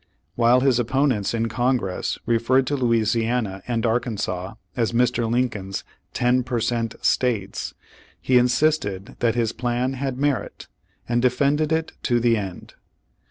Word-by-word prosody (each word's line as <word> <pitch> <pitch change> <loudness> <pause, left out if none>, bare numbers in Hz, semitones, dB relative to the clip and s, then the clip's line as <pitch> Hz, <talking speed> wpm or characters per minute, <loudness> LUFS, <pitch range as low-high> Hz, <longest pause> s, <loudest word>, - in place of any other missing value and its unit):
While 120 +4 +4
his 130 -2 +3
opponents 125 -3 +1
in 115 0 0
Congress 120 -5 -1
referred 120 +3 +2
to 145 - -1
Louisiana 115 -4 0
and 120 -1 -1
Arkansas 110 -5 -2 0.2
as 115 -3 0
Mr. 120 -1 +1
Lincoln's 110 -6 -1 0.3
"ten 125 +1 +2
per 125 -1 -2
cent, 115 -1 -1
states," 110 -6 0 0.4
he 125 -1 +4
insisted 125 -6 0
that 115 -1 +1
his 115 -2 +1
plan 120 +2 -1
had 135 -1 -3
merit, 145 -1 -2 0.4
and 120 0 +1
defended 140 +5 +2
it 160 0 0
to 120 -1 +1
the 120 -1 +3
end. 95 -5 -6
120 Hz, 135 wpm, -23 LUFS, 115-125 Hz, 0.4 s, While